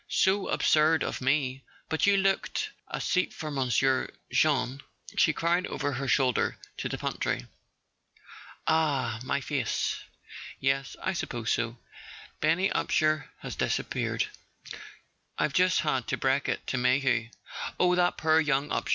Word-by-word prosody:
"So 195 +1 +2
absurd 155 +1 +3
of - - -3
me... 135 -1 +1 0.3
But 160 +4 +1
you 200 0 +5
looked... 195 0 0 0.2
A - - -4
seat 185 0 +1
for 155 -2 -5
monsieur, 130 -1 +1 0.2
Jeanne," 135 -1 +2 0.3
she 155 - +4
cried 170 +4 +1
over 145 0 -2
her 135 +1 -3
shoulder 130 -3 +2 0.2
to - - -3
the - - -3
pantry. - - -2 1.2
"Ah—my 140 -5 +1
face? 140 0 -1 0.6
Yes, 135 0 0
I 190 - 0
suppose 120 -9 -3
so. 115 0 -1 0.6
Benny 165 +5 +2
Upsher 155 0 +1
has - - -6
disappeared—I've 150 - -4
just 180 0 +3
had 135 -5 -1
to - - -1
break 135 +1 +1
it - - -2
to 130 - -1
Mayhew." 125 -2 +2 0.5
"Oh, 180 0 +4
that 180 0 +2
poor 160 0 +4
young 145 -2 +1
Upsher? - - -1
145 Hz, 135 wpm, -28 LUFS, 130-160 Hz, 1.2 s, you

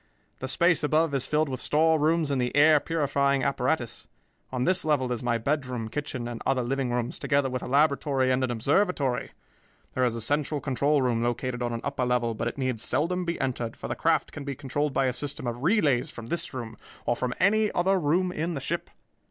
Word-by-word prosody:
The 130 - -4
space 170 +6 +2
above 155 +1 +2
is 135 -2 -1
filled 155 0 +1
with 130 -2 -4
storerooms 160 0 +2
and 135 -2 +1
the 125 +2 -2
air 150 +1 +6
purifying 140 -3 +1
apparatus. 130 -2 -1 0.4
On 125 -1 -1
this 185 +3 +2
level 140 -5 +1
is 120 - -2
my 120 -2 +1
bedroom, 125 -3 -2
kitchen, 130 -3 -4
and 120 -1 -6
other 130 -2 +1
living 135 +1 -1
rooms, 120 +1 -2
together 140 -2 +1
with 130 -1 -2
a - - -6
laboratory 140 -1 +2
and 130 +1 +1
an 130 - 0
observatory. 140 - +1 0.6
There 130 - 0
is 120 -2 +1
a - - -3
central 145 +5 0
control 140 +2 +1
room 120 -2 +1
located 120 +1 -2
on 120 0 -1
an 115 0 -3
upper - - -2
level, 125 -2 +1
but 110 - -3
it 120 - -4
need 130 -4 -1
seldom 180 +9 0
be 170 0 -2
entered, 120 -3 -2
for - - -6
the - - -3
craft 160 -3 +1
can 145 - -7
be 140 -1 -4
controlled 145 +2 -2
by 135 0 +1
a 130 - +1
system 145 +2 -4
of 120 0 -3
relays 150 - +2
from 120 - -9
this 170 +7 -3
room 115 -4 -6 0.3
or 120 - +1
from 125 0 -2
any 210 +3 +3
other 190 +2 +2
room 175 +4 +1
in 165 0 -2
the - - -2
ship. - - -3
135 Hz, 215 wpm, -27 LUFS, 125-155 Hz, 0.6 s, air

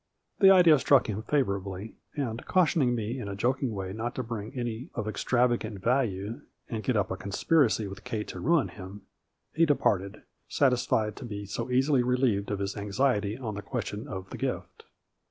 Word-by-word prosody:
The 195 - +8
idea 175 -6 +7
struck 140 0 +4
him 105 -1 -3
favorably, 100 -6 -2 0.2
and, 120 -5 -3
caution 175 -3 +3
ing 120 -2 +2
me 115 +3 -3
in 115 - -5
a 100 - -4
joking 125 +4 0
way 95 -2 -4
not 115 +3 -4
to 130 - -2
bring 110 -2 -5
any 120 +4 -4
of 110 -3 -3
ex 110 - -3
travagant 120 -4 +1
value 115 0 0 0.3
and 110 -2 -4
get 125 -4 +1
up 100 - 0
a - - -1
conspiracy 110 - +2
with 100 +1 -9
Kate 115 -4 -4
to - - -6
ruin 165 -3 +2
him, 95 +1 -10 0.5
he 165 +1 +3
departed, 100 -9 +1 0.2
satisfied 120 -5 +1
to - - -8
be 105 -3 -6
so 115 +5 -4
easily 130 +1 +3
relieved 125 -5 +1
of 100 - -1
his 100 0 -3
anxiety 105 +1 0
on 115 -5 -4
the 105 - -5
question 105 -1 -4
of 95 -1 -7
the - - -6
gift. - - -4
115 Hz, 190 wpm, -28 LUFS, 100-130 Hz, 0.5 s, The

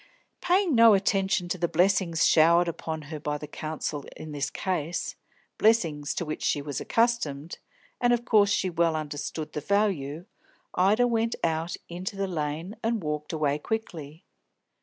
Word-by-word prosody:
Paying 360 -2 +2
no 230 -3 +7
attention 195 -2 +1
to 185 - -2
the 170 - +1
blessings 175 -1 +2
showered 170 +2 +5
upon 160 -1 -4
her 155 - -4
by 150 0 -2
the 150 - -7
counsel 150 -1 -4
in 155 - -8
this 145 -2 -2
case, 175 -3 -3 0.4
blessings 165 -10 +2
to 170 - -2
which 155 0 -5
she - - +1
was 145 -1 -4
accustomed, 175 -11 0 0.4
and 245 0 +3
of 240 -1 +2
which 205 -2 +6
she 190 -2 +1
well 165 -1 +2
understood 150 0 -5
the 150 - -3
value, 175 -5 0 0.5
Ida 205 +7 +3
went 230 -1 0
out 165 +1 0
into 180 +3 -5
the 195 0 -1
Lane, 160 +3 -3
and 225 -3 0
walked 150 0 -3
away 150 -2 0
quickly. 160 -6 -5
170 Hz, 160 wpm, -27 LUFS, 150-200 Hz, 0.5 s, no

